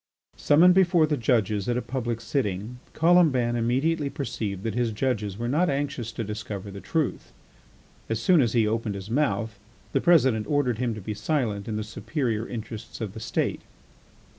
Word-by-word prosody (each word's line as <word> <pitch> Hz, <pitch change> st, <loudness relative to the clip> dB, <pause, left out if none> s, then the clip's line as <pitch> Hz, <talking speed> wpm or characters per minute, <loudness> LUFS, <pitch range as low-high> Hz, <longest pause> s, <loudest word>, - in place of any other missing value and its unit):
Summoned 170 Hz, +5 st, +5 dB
before 175 Hz, -3 st, +4 dB
the 150 Hz, -1 st, 0 dB
judges 110 Hz, -4 st, +1 dB
at 120 Hz, -, +1 dB
a -, -, 0 dB
public 120 Hz, -3 st, -3 dB
sitting, 115 Hz, -2 st, -2 dB
Colomban 155 Hz, -8 st, +4 dB
immediately 140 Hz, +6 st, +1 dB
perceived 110 Hz, -, -4 dB
that 115 Hz, -, -2 dB
his 120 Hz, -1 st, 0 dB
judges 105 Hz, -4 st, -2 dB
were 120 Hz, +1 st, -3 dB
not 155 Hz, +8 st, +2 dB
anxious 140 Hz, -4 st, -2 dB
to 115 Hz, -, -3 dB
discover 105 Hz, -2 st, -6 dB
the 100 Hz, 0 st, -8 dB
truth. 155 Hz, -, -2 dB, 0.8 s
As 115 Hz, -1 st, -1 dB
soon 170 Hz, +6 st, +4 dB
as 120 Hz, -, +1 dB
he 115 Hz, -3 st, +3 dB
opened 110 Hz, -1 st, -1 dB
his 100 Hz, +2 st, -7 dB
mouth 115 Hz, -6 st, 0 dB, 0.3 s
the -, -, +1 dB
President 130 Hz, -11 st, +4 dB
ordered 130 Hz, -6 st, +1 dB
him 120 Hz, -3 st, -1 dB
to 110 Hz, -, -7 dB
be 105 Hz, +3 st, -4 dB
silent 105 Hz, -2 st, -1 dB
in 110 Hz, -, -3 dB
the 110 Hz, -, -2 dB
superior 115 Hz, 0 st, -2 dB
interests 115 Hz, -1 st, -7 dB
of 110 Hz, -4 st, -4 dB
the 110 Hz, -, -8 dB
State. 110 Hz, -, -2 dB
120 Hz, 175 wpm, -26 LUFS, 110-140 Hz, 0.8 s, Summoned